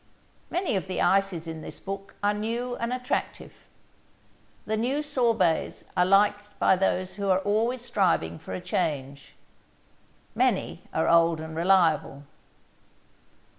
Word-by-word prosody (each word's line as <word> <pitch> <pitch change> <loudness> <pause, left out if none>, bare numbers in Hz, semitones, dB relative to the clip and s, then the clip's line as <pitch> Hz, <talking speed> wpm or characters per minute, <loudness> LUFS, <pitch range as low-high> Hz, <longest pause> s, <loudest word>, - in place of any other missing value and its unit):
Many 355 - -1
of 190 - -2
the 185 - -3
ices 195 -4 +2
in 160 -1 -6
this - - -9
book 195 0 -7
are 205 0 +3
new 235 +4 -3
and 235 +1 -3
attractive. 250 0 -3 1.1
The 220 - -1
new 260 +7 0
sorbets 230 - +1
are 180 -1 +3
liked 205 +1 +2
by - - +4
those 185 0 0
who 200 -1 -2
are 185 - +5
always 225 +5 0
striving 85 - +1
for 95 - -7
a 90 - -5
change. 140 -5 -3 1.0
Many - - 0
are - - 0
old 165 -1 +4
and 160 0 -7
reliable. 165 -5 +2
195 Hz, 130 wpm, -26 LUFS, 165-220 Hz, 1.1 s, are